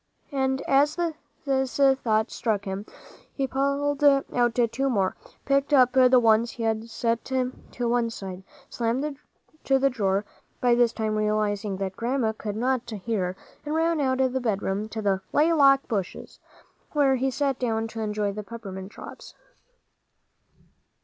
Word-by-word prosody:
And 265 Hz, -1 st, 0 dB
as 285 Hz, +4 st, +2 dB, 0.5 s
this 265 Hz, -2 st, 0 dB
thought 250 Hz, -5 st, +2 dB
struck 215 Hz, -3 st, -1 dB
him, 195 Hz, +2 st, -5 dB, 0.4 s
he 275 Hz, -, -2 dB
pulled 280 Hz, +2 st, -1 dB
out 260 Hz, -4 st, +3 dB, 0.2 s
two 270 Hz, +4 st, 0 dB
more, 195 Hz, -6 st, 0 dB, 0.3 s
picked 275 Hz, +1 st, +1 dB
up 255 Hz, -3 st, +6 dB
the 255 Hz, 0 st, +6 dB
ones 230 Hz, 0 st, +3 dB
he 235 Hz, -, -5 dB
had 225 Hz, 0 st, -1 dB
set 230 Hz, 0 st, -1 dB
to 255 Hz, -1 st, -1 dB, 0.4 s
one 235 Hz, 0 st, +1 dB
side, 190 Hz, -4 st, -7 dB, 0.3 s
slammed 265 Hz, +5 st, -2 dB, 0.4 s
to 270 Hz, -, +3 dB
the 275 Hz, +1 st, +2 dB
drawer, 200 Hz, -3 st, 0 dB, 0.3 s
by 245 Hz, -1 st, +3 dB
this 240 Hz, -1 st, +4 dB
time 220 Hz, -2 st, -2 dB
realizing 210 Hz, -1 st, 0 dB
that 190 Hz, -1 st, -4 dB
Grandma 235 Hz, +1 st, 0 dB
could 210 Hz, -1 st, -5 dB
not 250 Hz, +2 st, -1 dB
hear, 200 Hz, -4 st, -2 dB, 0.3 s
and 300 Hz, +1 st, -3 dB
ran 325 Hz, 0 st, +1 dB
out 260 Hz, -1 st, +1 dB
of 260 Hz, -1 st, +2 dB
the 260 Hz, -, -1 dB
bedroom 205 Hz, -2 st, -1 dB
to 220 Hz, 0 st, -5 dB
the 195 Hz, -2 st, +1 dB
"laylock" 290 Hz, -3 st, +5 dB
bushes, 200 Hz, -7 st, -4 dB, 0.5 s
where 275 Hz, -3 st, +3 dB
he 265 Hz, +2 st, 0 dB
sat 275 Hz, 0 st, -1 dB
down 225 Hz, -2 st, -1 dB
to 225 Hz, -, -7 dB
enjoy 210 Hz, -1 st, -1 dB
the 210 Hz, -, -5 dB
peppermint 195 Hz, -3 st, -8 dB
drops. -, -, -11 dB
240 Hz, 150 wpm, -26 LUFS, 215-270 Hz, 0.5 s, up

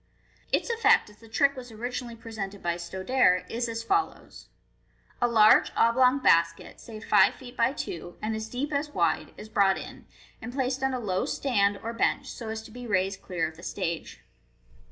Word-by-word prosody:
Its -, -, +1 dB
effect, 455 Hz, -, +3 dB
as 210 Hz, -, -20 dB
the 225 Hz, 0 st, -17 dB
trick 280 Hz, +5 st, +2 dB
was 250 Hz, -2 st, -9 dB
originally 240 Hz, +1 st, -5 dB
presented 215 Hz, -4 st, -7 dB
by 170 Hz, -1 st, 0 dB
Stodare, 185 Hz, +2 st, +1 dB
is 235 Hz, +1 st, -2 dB
as 230 Hz, 0 st, -4 dB
follows: 395 Hz, -, -2 dB, 0.4 s
— -, -, -35 dB
A 240 Hz, -, +4 dB
large 220 Hz, -2 st, +5 dB
oblong 250 Hz, +3 st, +4 dB
basket, 165 Hz, -10 st, +2 dB
say 220 Hz, -3 st, -9 dB
five 220 Hz, -, +4 dB
fe°t 250 Hz, -1 st, -12 dB
by 235 Hz, +2 st, +2 dB
two, 175 Hz, -, -6 dB
and 220 Hz, +1 st, -2 dB
as 220 Hz, 0 st, -5 dB
deep 280 Hz, +6 st, -3 dB
as 290 Hz, +1 st, -1 dB
wide, -, -, +1 dB
is 215 Hz, -, -9 dB
brought 200 Hz, -3 st, +3 dB
in, -, -, -10 dB, 0.3 s
and 245 Hz, -, -6 dB
placed 265 Hz, 0 st, -1 dB
on 265 Hz, -1 st, 0 dB
a -, -, -2 dB
low 190 Hz, -5 st, -1 dB
stand 205 Hz, -7 st, +1 dB
or 230 Hz, +1 st, -4 dB
bench, 270 Hz, +4 st, 0 dB
so 230 Hz, -2 st, -7 dB
as 220 Hz, 0 st, -5 dB
to -, -, -13 dB
be 245 Hz, +1 st, -8 dB
raised 195 Hz, -1 st, 0 dB
clear 180 Hz, -3 st, -2 dB
of 160 Hz, 0 st, -11 dB
the -, -, -12 dB
stage. 170 Hz, -3 st, -4 dB
225 Hz, 195 wpm, -27 LUFS, 195-250 Hz, 0.4 s, large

